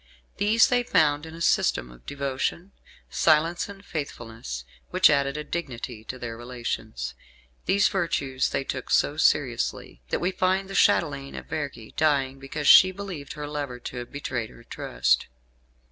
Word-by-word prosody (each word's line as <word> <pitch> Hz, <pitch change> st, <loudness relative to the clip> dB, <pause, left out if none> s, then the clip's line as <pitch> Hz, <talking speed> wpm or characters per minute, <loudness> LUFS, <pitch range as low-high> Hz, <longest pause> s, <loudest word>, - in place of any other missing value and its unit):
These 215 Hz, +3 st, +4 dB
they 245 Hz, -1 st, +3 dB
found 150 Hz, -9 st, +2 dB
in 160 Hz, -, -9 dB
a 165 Hz, -, -9 dB
system 60 Hz, -, +2 dB
of -, -, -17 dB
devotion, 140 Hz, +6 st, -2 dB, 0.4 s
silence 165 Hz, +3 st, +3 dB
and 200 Hz, 0 st, -11 dB
faithfulness, 115 Hz, -, -6 dB, 0.2 s
which 185 Hz, -3 st, +5 dB
added 140 Hz, 0 st, +1 dB
a 150 Hz, -, -3 dB
dignity 125 Hz, -8 st, -5 dB
to 130 Hz, -, -6 dB
their 120 Hz, -2 st, -5 dB
relations. 115 Hz, -, -5 dB, 0.5 s
These 200 Hz, +1 st, +4 dB
virtues 140 Hz, -8 st, 0 dB
they 135 Hz, -, -1 dB
took 130 Hz, -1 st, -5 dB
so 145 Hz, -, +3 dB
seriously 125 Hz, -, +1 dB
that -, -, +1 dB
we 180 Hz, +2 st, 0 dB
find 190 Hz, +1 st, +1 dB
the -, -, -5 dB
Chatelaine 140 Hz, -7 st, +2 dB
of -, -, -7 dB
Vergi 145 Hz, -8 st, -5 dB
dying 135 Hz, -3 st, +2 dB
because 140 Hz, +2 st, -4 dB
she 185 Hz, -, +9 dB
believed 185 Hz, -7 st, -7 dB
her 150 Hz, -1 st, -6 dB
lover 145 Hz, -4 st, -4 dB
to 125 Hz, -, -7 dB
have 120 Hz, 0 st, -6 dB
betrayed 130 Hz, -5 st, -3 dB
her 120 Hz, -, -15 dB
trust. 65 Hz, -, 0 dB
140 Hz, 160 wpm, -26 LUFS, 120-170 Hz, 0.5 s, she